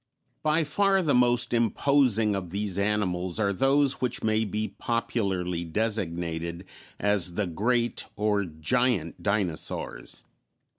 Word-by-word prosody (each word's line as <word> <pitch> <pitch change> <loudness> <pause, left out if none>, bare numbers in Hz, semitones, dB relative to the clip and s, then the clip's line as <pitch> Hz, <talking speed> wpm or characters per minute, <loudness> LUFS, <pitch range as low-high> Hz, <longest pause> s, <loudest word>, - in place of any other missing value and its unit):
_ - - -49
By 155 +1 +2
far 195 +5 +2
the 150 - +2
most 120 0 +3
imposing 115 -1 +3
of 95 -3 -4
these 100 +1 -2
animals 95 -3 0
are 100 -2 +1
those 135 +5 +2
which 125 -2 -1
may 110 0 +2
be 105 +1 -2
popularly 95 -7 -1
designated 85 -3 -2 0.3
as 100 -4 +1
the 105 - 0
great 120 +7 0
or 105 -1 +1
giant 90 +3 0
dinosaurs. 100 -6 -2
105 Hz, 120 wpm, -27 LUFS, 90-120 Hz, 0.3 s, most